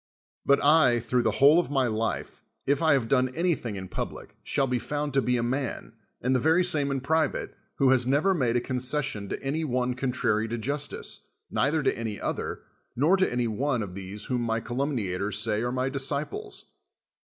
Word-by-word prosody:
But 140 - +4
I, 145 -5 +5
through 125 +2 0
the - - +2
whole 145 +5 +7
of 175 - -1
my 135 -2 +2
life, 110 -1 -2 0.2
if 140 +2 +1
I 160 -2 +5
have 130 -5 +1
done 130 +1 +3
anything 165 - 0
in 95 -1 -6
public, - - -6
shall 140 - 0
be 125 -1 0
found 145 +2 -3
to 135 - +3
be 125 -1 +1
a 120 - 0
man, 125 -2 -3 0.3
and 130 +2 +2
the - - +3
very 160 +6 +3
same 150 -5 0
in 135 -1 -1
pri 160 +4 +2
vate, - - -5 0.3
who 135 -2 +4
has 125 -2 +3
never 150 +9 +3
made 125 -9 +1
a 120 - +2
concession 125 -5 -1
to - - -5
any 145 +4 -1
one 125 -3 0
contrary 125 -4 0
to 120 +1 -3
justice, 140 +6 -3 0.2
neither 150 +1 +1
to 135 - +2
any 110 -3 -4
other, - - -3 0.3
nor 155 +9 +4
to 190 -1 +1
any 120 -1 0
one 125 +2 0
of 95 -3 -7
these 100 +2 -7
whom 125 -2 -1
my 115 -1 0
calumniators 110 -6 -2
say 105 0 +1
are 120 +1 -1
my 130 +1 0
disciples. 140 - -3
130 Hz, 200 wpm, -27 LUFS, 115-145 Hz, 0.3 s, whole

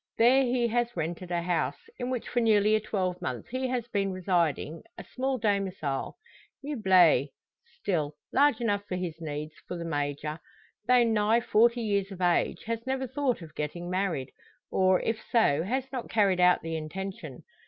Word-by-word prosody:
There 250 +4 +6
he 245 -2 +1
has 240 -2 -1
rented 170 +2 -3
a 175 -1 -1
house, 175 -1 0 0.2
in 245 - -2
which 255 -3 -3
for 245 - 0
nearly 215 -2 +4
a 215 - +4
twelvemonth 180 - -3
he 255 +1 -2
has 245 -2 -2
been 195 -2 0
residing: 170 -4 0 0.2
a - - -7
small 265 +1 -2
domicile, 195 - -1 0.5
meuble. 185 - +4 0.5
Still, 155 -6 -1 0.2
large 285 -4 +4
enough 205 -4 0
for 185 - -4
his 170 -3 -4
needs: 155 0 -5
for 180 - -4
the 170 - -5
Major, 145 0 -3 0.5
though 250 -1 +6
nigh 220 0 +3
forty 235 +1 +3
years 200 -3 0
of 190 - -8
age, 175 -1 +1
has 230 +2 -4
never 265 0 -1
thought 255 -5 -1
of 155 - -12
getting 175 +4 -4
married; 180 -9 -1 0.4
or, 185 -1 +3
if 225 -1 -2
so, 160 -11 +3
has 255 +9 -1
not 255 -3 -5
carried 200 -4 +2
out 180 0 +4
the 165 0 -3
intention. 190 +5 -6
195 Hz, 170 wpm, -28 LUFS, 170-235 Hz, 0.5 s, There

